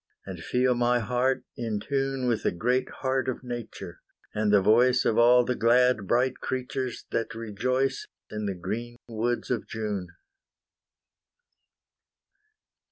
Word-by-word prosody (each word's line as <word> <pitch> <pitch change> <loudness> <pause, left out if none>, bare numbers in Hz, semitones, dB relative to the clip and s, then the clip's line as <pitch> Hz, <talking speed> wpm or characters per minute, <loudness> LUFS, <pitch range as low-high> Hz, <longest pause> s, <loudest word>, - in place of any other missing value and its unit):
And 95 -3 -7
feel 125 +5 +2
my 120 0 +2
heart 125 +3 0
in 115 -3 -2
tune 135 +1 -1
With 120 -3 +1
the - - +1
great 125 +8 0
heart 130 -1 -1
of 130 - -4
Nature, 115 - -7 0.3
and 105 0 +1
the 105 - +6
voice 120 +5 +4
Of 110 - +2
all 120 +1 +6
the 125 - 0
glad 120 -2 +3
bright 125 +4 +2
creatures 130 -1 -3
that 115 0 -2
rejoice 125 +4 -1 0.2
In 105 -1 -3
the 100 - -2
green 120 +7 -5
woods 120 +2 -2
of 120 -4 -1
June. 105 -5 -3
120 Hz, 135 wpm, -27 LUFS, 110-125 Hz, 0.3 s, the